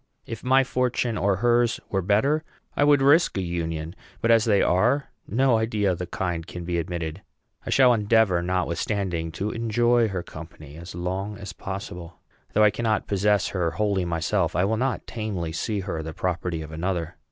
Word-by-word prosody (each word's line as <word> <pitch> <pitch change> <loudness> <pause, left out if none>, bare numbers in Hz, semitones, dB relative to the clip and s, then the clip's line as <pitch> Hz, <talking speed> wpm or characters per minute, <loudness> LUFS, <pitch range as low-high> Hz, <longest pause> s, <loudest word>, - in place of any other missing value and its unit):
If 115 -1 -7
my 130 +1 +4
fortune 125 -2 0
or 100 -1 +1
hers 120 0 +3
were 95 - +1
better, 125 - +2 0.3
I - - +3
would 145 -2 +5
risk 145 - +4
a - - 0
union; 85 -1 -3 0.2
but 115 - +2
as 115 0 +5
they 105 -4 +3
are, 125 +10 +2 0.2
no 120 +1 +3
idea 110 -3 +1
of 90 - -3
the 90 - -4
kind 85 -3 -3
can 90 -1 -7
be 85 0 -1
admitted. 85 +1 -4 0.5
I - - -3
shall 130 -2 +5
endeavor, 105 -4 +3
notwithstanding, 90 -1 -1
to 100 +5 -3
enjoy 120 +1 +2
her 95 -4 -3
company 75 -2 -11
as 85 +2 -9
long 95 +4 -3
as 95 -1 -8
possible. 90 -3 -7 0.4
Though 110 - +4
I 105 - +6
cannot 110 -3 0
possess 100 -1 +1
her 90 -3 0
wholly 100 +2 0
myself, 85 +1 0
I 90 - +3
will 110 +3 +1
not 130 +2 -1
tamely 100 -8 -4
see 100 +5 -2
her 90 -4 -4
the 80 0 -6
property 85 -2 -2
of 80 - -10
another. 85 +1 -3
95 Hz, 185 wpm, -25 LUFS, 85-115 Hz, 0.5 s, I